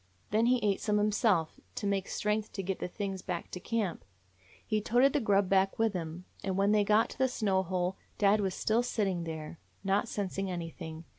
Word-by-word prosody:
Then 220 Hz, +3 st, +3 dB
he 250 Hz, +1 st, +5 dB
ate 200 Hz, -2 st, +1 dB
some 210 Hz, -1 st, +1 dB
himself, 210 Hz, -5 st, +2 dB, 0.2 s
to -, -, -3 dB
make 200 Hz, -1 st, 0 dB
strength 210 Hz, 0 st, -1 dB
to 195 Hz, -, -3 dB
get 190 Hz, 0 st, -2 dB
the -, -, -2 dB
things 195 Hz, 0 st, -4 dB
back 175 Hz, -2 st, -4 dB
to 180 Hz, -, -5 dB
camp. 205 Hz, -2 st, -2 dB, 0.6 s
He 215 Hz, -1 st, 0 dB
toted 245 Hz, +5 st, +4 dB
the 295 Hz, -, +3 dB
grub 200 Hz, -5 st, +3 dB
back 195 Hz, 0 st, +2 dB
with 225 Hz, -2 st, +2 dB
him, 170 Hz, 0 st, -5 dB, 0.2 s
and 190 Hz, -1 st, -1 dB
when 200 Hz, +1 st, +3 dB
they 210 Hz, -1 st, +4 dB
got 210 Hz, +2 st, +3 dB
to -, -, -11 dB
the 260 Hz, -, +4 dB
snow 205 Hz, -7 st, +1 dB
hole 185 Hz, 0 st, -1 dB, 0.2 s
dad 205 Hz, +1 st, +4 dB
was 190 Hz, -2 st, -1 dB
still 220 Hz, +2 st, +2 dB
sitting 195 Hz, -8 st, -1 dB
there, 160 Hz, 0 st, -6 dB, 0.2 s
not 200 Hz, +4 st, +1 dB
sensing 195 Hz, -2 st, -2 dB
anything. 165 Hz, -2 st, -6 dB
195 Hz, 205 wpm, -31 LUFS, 180-215 Hz, 0.6 s, he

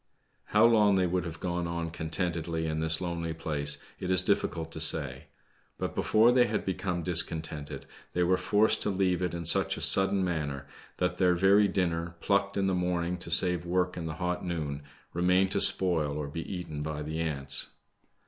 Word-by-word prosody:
liow 110 Hz, +2 st, +5 dB
long 105 Hz, -3 st, +4 dB
they 95 Hz, -1 st, +2 dB
would 90 Hz, 0 st, -1 dB
have 85 Hz, -1 st, -7 dB
gone 90 Hz, -1 st, -3 dB
on 85 Hz, -1 st, -4 dB
contentedly 80 Hz, 0 st, -3 dB
in 80 Hz, -1 st, -2 dB
this 80 Hz, +1 st, 0 dB
lonely 85 Hz, -2 st, -3 dB
place, 75 Hz, -3 st, -2 dB, 0.2 s
it 90 Hz, -, -5 dB
is 95 Hz, 0 st, +3 dB
difficult 90 Hz, -5 st, -1 dB
to 80 Hz, -, -6 dB
say. 70 Hz, -5 st, +2 dB, 0.5 s
But -, -, -4 dB
before 110 Hz, +3 st, +3 dB
they 125 Hz, -1 st, +4 dB
had -, -, -3 dB
become 95 Hz, -2 st, -3 dB
discontented 80 Hz, -4 st, -1 dB, 0.3 s
they 90 Hz, -, +1 dB
were 90 Hz, +1 st, +3 dB
forced 105 Hz, +4 st, +1 dB
to -, -, 0 dB
leave 95 Hz, -2 st, 0 dB
it 90 Hz, -2 st, -2 dB
in 85 Hz, -, -5 dB
su^ 85 Hz, -, +2 dB
a -, -, -7 dB
sudden 95 Hz, 0 st, +4 dB
manner 75 Hz, -5 st, -3 dB, 0.3 s
that 90 Hz, 0 st, -2 dB
their 90 Hz, -2 st, +3 dB
very 100 Hz, +3 st, +4 dB
dinner,^ 85 Hz, -3 st, -2 dB
plucked 100 Hz, +2 st, 0 dB
in 100 Hz, -, +1 dB
the 95 Hz, -, 0 dB
morning 90 Hz, -1 st, -1 dB
to 85 Hz, -, -7 dB
save 90 Hz, 0 st, +2 dB
work 90 Hz, +1 st, -1 dB
in 85 Hz, -2 st, -5 dB
the 80 Hz, -, -5 dB
hot 90 Hz, +1 st, -3 dB
noon, 75 Hz, -5 st, -4 dB, 0.3 s
remained 90 Hz, +2 st, +2 dB
to -, -, 0 dB
spoil 80 Hz, -6 st, +4 dB
or 75 Hz, -1 st, -4 dB
be 80 Hz, +3 st, -7 dB
eaten 85 Hz, -5 st, -6 dB
by 75 Hz, 0 st, -4 dB
the 80 Hz, +2 st, -5 dB
ants. 70 Hz, -4 st, +1 dB
85 Hz, 190 wpm, -28 LUFS, 80-95 Hz, 0.5 s, liow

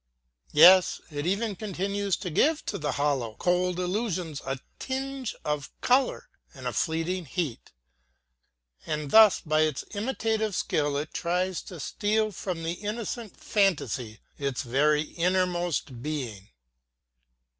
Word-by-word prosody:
Yes, 180 Hz, +4 st, +7 dB
it 145 Hz, +2 st, -3 dB
even 200 Hz, +2 st, 0 dB
continues 200 Hz, 0 st, -2 dB
to 180 Hz, -, -5 dB
give 310 Hz, -, +2 dB
to -, -, -3 dB
the 150 Hz, -, -1 dB
hollow, 135 Hz, -6 st, 0 dB
cold 180 Hz, +2 st, +1 dB
illusions 180 Hz, -5 st, -2 dB
a 135 Hz, 0 st, -3 dB, 0.2 s
tinge 265 Hz, -1 st, -3 dB
of 150 Hz, -4 st, -2 dB
color 255 Hz, +2 st, +2 dB, 0.3 s
and -, -, -10 dB
a -, -, -1 dB
fleeting 165 Hz, +2 st, -1 dB
heat; 150 Hz, -3 st, -4 dB, 1.2 s
and 150 Hz, -2 st, -3 dB
thus 220 Hz, -2 st, +7 dB
by 155 Hz, -1 st, +1 dB
its 155 Hz, -3 st, 0 dB
imitative 220 Hz, -2 st, -1 dB
skill 145 Hz, -4 st, 0 dB
it 150 Hz, +2 st, -4 dB
tries 180 Hz, +1 st, -1 dB
to 175 Hz, -, -10 dB
steal 215 Hz, +7 st, 0 dB
from 180 Hz, -4 st, -4 dB
the 165 Hz, -, -1 dB
innocent 220 Hz, +1 st, -4 dB
fantasy 145 Hz, -, 0 dB, 0.2 s
its 140 Hz, -2 st, -2 dB
very 150 Hz, +5 st, +2 dB
innermost 175 Hz, -6 st, -1 dB
being. 125 Hz, -9 st, -5 dB
175 Hz, 125 wpm, -27 LUFS, 150-205 Hz, 1.2 s, Yes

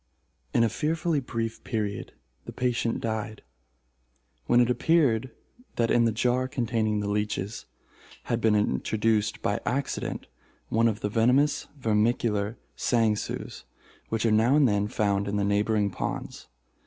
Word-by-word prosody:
In 115 Hz, -, +3 dB
a -, -, +4 dB
fearfully 160 Hz, +2 st, 0 dB
brief 115 Hz, -3 st, -4 dB
period 105 Hz, -4 st, -3 dB, 0.3 s
the -, -, -7 dB
patient 120 Hz, -2 st, -1 dB
died, 110 Hz, -1 st, -4 dB, 1.0 s
when 120 Hz, -, +5 dB
it 120 Hz, -, +5 dB
appeared 130 Hz, -5 st, +2 dB, 0.5 s
that 115 Hz, -1 st, +1 dB
in 120 Hz, -1 st, +4 dB
the 115 Hz, -, +2 dB
jar 125 Hz, +3 st, +1 dB
containing 115 Hz, -4 st, -1 dB
the 100 Hz, -, -3 dB
leeches, 105 Hz, 0 st, -2 dB, 0.6 s
had 120 Hz, 0 st, -2 dB
been 110 Hz, -1 st, +3 dB
introduced, 105 Hz, -, 0 dB
by 100 Hz, -, 0 dB
accident, 140 Hz, +2 st, -2 dB, 0.4 s
one 115 Hz, +1 st, +3 dB
of 110 Hz, -1 st, -2 dB
the 105 Hz, -, -1 dB
venomous 125 Hz, +7 st, +2 dB
vermicular 110 Hz, -2 st, +1 dB, 0.2 s
sangsues 110 Hz, -3 st, -1 dB, 0.5 s
which 115 Hz, 0 st, -1 dB
are 115 Hz, -, +3 dB
now 115 Hz, +5 st, +4 dB
and 150 Hz, -3 st, +5 dB
then 105 Hz, -2 st, +1 dB
found 100 Hz, -3 st, 0 dB
in 100 Hz, -, -2 dB
the 100 Hz, -, +1 dB
neighboring 105 Hz, 0 st, +1 dB
ponds. -, -, -5 dB
115 Hz, 140 wpm, -27 LUFS, 105-120 Hz, 1.0 s, when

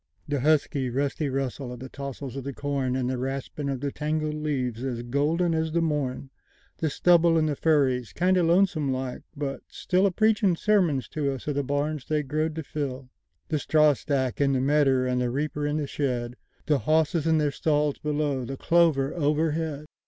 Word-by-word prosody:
The 145 Hz, -1 st, -1 dB
husky, 140 Hz, -2 st, +1 dB
rusty 140 Hz, +3 st, -1 dB
russel 135 Hz, -1 st, -3 dB
of 125 Hz, -, -8 dB
the 130 Hz, -, -7 dB
tossels 140 Hz, -1 st, -7 dB
of 135 Hz, -, -5 dB
the 140 Hz, -1 st, -5 dB
corn, 140 Hz, -3 st, -1 dB
And 130 Hz, -1 st, -1 dB
the 130 Hz, -1 st, -2 dB
raspin' 135 Hz, +2 st, -4 dB
of 135 Hz, -2 st, -3 dB
the 140 Hz, -1 st, -2 dB
tangled 155 Hz, +1 st, -2 dB
leaves 130 Hz, -6 st, -2 dB
as 120 Hz, -3 st, -3 dB
golden 155 Hz, +7 st, +1 dB
as 160 Hz, 0 st, -1 dB
the 170 Hz, -, +2 dB
morn; 140 Hz, -4 st, -2 dB, 0.5 s
The 160 Hz, -, 0 dB
stubble 170 Hz, +2 st, +4 dB
in 155 Hz, -, +3 dB
the 150 Hz, -2 st, 0 dB
furries—kindo' 150 Hz, -, +2 dB
lonesome 170 Hz, -4 st, +2 dB
like, 130 Hz, -1 st, -3 dB, 0.2 s
but 140 Hz, -2 st, -3 dB
stillA 185 Hz, +2 st, +1 dB
preachin' 210 Hz, -1 st, +2 dB
sermuns 165 Hz, -, +2 dB
to 145 Hz, -3 st, -1 dB
us 135 Hz, -, -6 dB
of 150 Hz, -, 0 dB
the 145 Hz, 0 st, -1 dB
barns 145 Hz, +1 st, -2 dB
they 155 Hz, -1 st, 0 dB
growed 155 Hz, +3 st, -1 dB
to 160 Hz, -, -4 dB
fill; 135 Hz, -3 st, -5 dB, 0.4 s
The 155 Hz, -, 0 dB
strawstack 145 Hz, -4 st, +2 dB
in 140 Hz, -1 st, +3 dB
the 130 Hz, -, +1 dB
medder, 135 Hz, -1 st, +3 dB
and 125 Hz, 0 st, 0 dB
the 125 Hz, -, 0 dB
reaper 145 Hz, +3 st, -2 dB
in 150 Hz, +1 st, -1 dB
the 150 Hz, -, -1 dB
shed; 125 Hz, -4 st, -2 dB, 0.3 s
The 150 Hz, -2 st, +2 dB
hosses 155 Hz, +1 st, +1 dB
in 160 Hz, -1 st, +4 dB
theyr 150 Hz, -2 st, +1 dB
stalls 150 Hz, -2 st, 0 dB
below—the 145 Hz, -3 st, -2 dB
clover 160 Hz, -5 st, +3 dB
overhead! 155 Hz, -1 st, 0 dB
145 Hz, 180 wpm, -26 LUFS, 135-155 Hz, 0.5 s, stubble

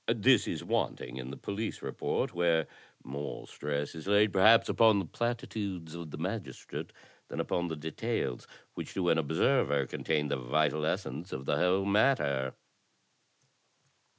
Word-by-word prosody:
"This -, -, +4 dB
is -, -, -3 dB
wanting 60 Hz, +1 st, -2 dB
in 65 Hz, 0 st, -5 dB
the 70 Hz, -, -7 dB
police 105 Hz, +2 st, -4 dB
report, -, -, -2 dB
where 85 Hz, -2 st, +2 dB, 0.4 s
more 70 Hz, +2 st, -5 dB
stress 75 Hz, 0 st, -3 dB
is 80 Hz, +2 st, -8 dB
laid 105 Hz, 0 st, +4 dB
perhaps 110 Hz, +4 st, +6 dB
upon 110 Hz, -2 st, +5 dB
the 95 Hz, -, -1 dB
platitudes 100 Hz, -5 st, -3 dB
of 85 Hz, -2 st, -7 dB
the -, -, -7 dB
magistrate -, -, -5 dB, 0.4 s
than -, -, -6 dB
upon 85 Hz, 0 st, 0 dB
the 80 Hz, -, -3 dB
details, 75 Hz, -5 st, -3 dB, 0.3 s
which -, -, -7 dB
to 90 Hz, -2 st, +1 dB
an 80 Hz, -, +4 dB
observer 80 Hz, -, +2 dB
contain 75 Hz, +1 st, -1 dB
the 70 Hz, -, 0 dB
vital 75 Hz, +4 st, +1 dB
essence 80 Hz, +5 st, -3 dB
of 65 Hz, -, -5 dB
the -, -, +1 dB
whole 95 Hz, +2 st, +2 dB
matter." 100 Hz, -, +2 dB
80 Hz, 150 wpm, -31 LUFS, 70-100 Hz, 0.4 s, perhaps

